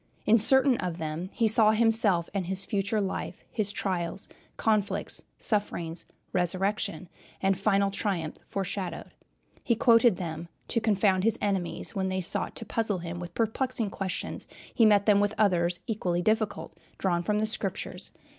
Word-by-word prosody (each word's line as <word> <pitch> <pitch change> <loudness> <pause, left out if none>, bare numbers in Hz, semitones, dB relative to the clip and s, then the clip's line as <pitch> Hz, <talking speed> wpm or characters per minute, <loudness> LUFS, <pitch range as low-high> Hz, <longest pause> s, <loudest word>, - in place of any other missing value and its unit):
In 225 +2 +5
certain 265 +3 +4
of 175 -2 -3
them 160 +2 -4
he 230 - +1
saw 215 0 +5
himself 220 -6 +4
and 190 -4 -2
his 190 +1 -3
future 205 +2 0
life, 195 -2 -4
his 205 -3 -1
trials, 185 -2 -2 0.3
conflicts, 215 -3 0 0.2
sufferings, 175 -6 -2 0.3
resurrection, 185 -1 0 0.3
and 195 0 +2
final 195 0 +2
triumph 185 -6 -2
foreshadowed. 195 -1 -4 0.5
He 235 - +2
quoted 230 -1 +5
them 165 -2 -5 0.2
to 230 - +1
confound 195 -3 +2
his 225 +1 +2
enemies. 195 -4 -1
When 190 -1 -1
they 185 0 -1
sought 180 - -1
to 225 - -6
puzzle 220 -2 -1
him 175 0 -6
with 175 -1 -8
perplexing 230 -1 0
questions 190 -1 -4 0.3
he 225 - +5
met 205 -1 +4
them 205 -2 +5
with 205 +1 +1
others 175 -4 +2
equally 180 -7 -1
difficult, 215 +1 -1 0.2
drawn 175 -3 0
from 210 +4 0
the 215 - +1
Scriptures. 215 - -3
200 Hz, 155 wpm, -28 LUFS, 180-215 Hz, 0.5 s, In